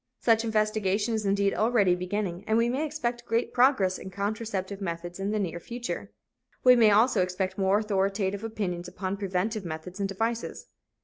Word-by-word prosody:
Such 225 -1 +3
investigation 215 -1 +1
is 215 -2 -1
indeed 200 0 +2
already 215 -5 +3
beginning 180 0 -3
and 220 - +3
we 230 +1 +3
may 265 +5 -1
expect 245 -5 -3
great 230 +1 0
progress 245 -8 +3
in 190 - -8
contraceptive 200 0 -3
methods 175 0 -5
in 195 +1 -1
the 215 - 0
near 175 -4 -2
future. 240 +6 -5 0.5
We 250 0 +8
may 225 -3 +6
also 215 0 +4
expect 185 +1 -2
more 195 +1 +3
authoritative 200 -1 0
opinions 190 -6 -3
upon 185 +2 -4
preventive 195 +2 -2
methods 170 +3 -7
and 195 -1 -1
devices. 225 +4 -3
200 Hz, 170 wpm, -27 LUFS, 190-225 Hz, 0.5 s, We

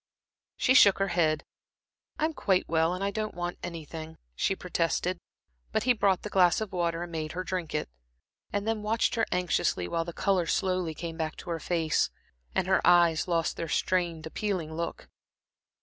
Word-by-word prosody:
She 255 - +3
shook 200 -6 +7
her 195 0 0
head. 160 -3 +1 0.7
"I'm 315 +1 0
quite 190 -9 +1
well, 165 +2 +2
and 185 - -4
I 200 - 0
don't 215 +1 -3
want 175 0 -4
anything," 160 -1 -7 0.2
she 195 - 0
protested, 180 0 -1 0.5
but - - 0
he 250 - +4
brought 200 -5 +2
the 210 - -4
glass 180 -3 +4
of 215 -2 -4
water 170 -2 -1
and 175 - -8
made 155 -1 -4
her 185 +2 -3
drink 180 -4 -3
it, 150 - -1 0.6
and 205 +1 -2
then 225 -1 0
watched 220 +2 +1
her 225 -1 +1
anxiously, 180 - +1
while 165 - -1
the 170 - -6
color 180 -1 +1
slowly 185 -4 0
came 165 0 -6
back 160 -1 -2
to 175 - -7
her 165 - -2
face, 165 -3 +1 0.5
and - - +2
her 190 0 +3
eyes 175 -2 +5
lost 165 -2 0
their 165 - -4
strained, 170 -3 0
appealing 170 -2 -3
look. 170 +1 -4
175 Hz, 180 wpm, -29 LUFS, 165-195 Hz, 0.7 s, shook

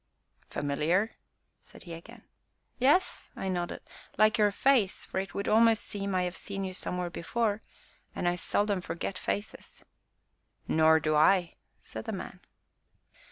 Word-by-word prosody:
"Familiar?" 155 +9 0 0.5
said - - -14
he 170 - -8
again. 215 +8 -11 0.6
"Yes," 290 +9 +3
I 190 - -3
nodded; 175 -2 -2 0.4
"like 215 +1 +4
your 210 -1 +5
face, 230 -3 +2
for - - -3
it 190 -2 -5
would 200 - -2
almost 225 0 +5
seem 200 -1 -4
that - - +2
I - - +2
have 180 0 -3
seen 195 -1 -5
you 190 -1 -4
somewhere 180 -1 -3
before, 215 +5 -1 0.5
and 175 - -1
I 175 - +2
seldom 205 +2 0
forget 170 +2 -4
faces." 205 - -4 0.8
"Nor 160 0 +5
do 155 0 +1
I!" 175 +3 +4 0.3
said - - -7
the - - -3
man. - - -8
190 Hz, 150 wpm, -30 LUFS, 175-215 Hz, 0.8 s, your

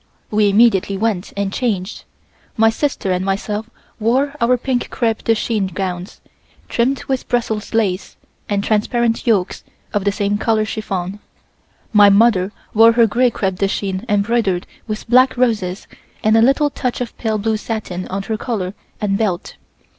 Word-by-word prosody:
We 210 -1 +3
immediately 200 -2 +3
went 210 -3 -1
and 200 -1 -1
changed. 210 -6 -2 0.5
My 225 0 +5
sister 250 -6 -1
and 180 0 0
myself 210 +3 -2 0.3
wore 260 +6 +1
our 245 +2 +3
pink 250 0 -2
crepe 225 -3 -1
de 225 - +3
chine 215 -3 -1
gowns, 185 0 -5 0.5
trimmed 255 +3 0
with 265 -2 -3
Brussels 225 -4 -1
lace 195 -4 -1 0.3
and 200 -1 0
transparent 230 +3 0
yokes 200 -5 +1 0.3
of 205 - 0
the 200 - +2
same 205 0 -1
color 220 -1 +1
chiffon. 200 -3 -4 0.7
My 205 -1 +7
mother 200 -2 +4 0.2
wore 225 +1 +6
her 235 0 +5
gray 245 +3 +2
crepe 190 -5 -2
de 195 - +1
chine 195 0 -3
embroidered 205 -3 +1 0.2
with 215 -1 -5
black 255 +2 +4
roses 210 -7 0 0.4
and 215 +1 +4
a 225 - +5
little 275 +4 +3
touch 250 -2 -3
of 245 -2 -5
pale 220 -2 0
blue 220 +1 0
satin 210 -5 -4
on 195 +1 -3
her 220 +2 -3
collar 200 -6 -3 0.3
and 200 -1 0
belt. 195 -5 -2
215 Hz, 160 wpm, -18 LUFS, 195-235 Hz, 0.7 s, My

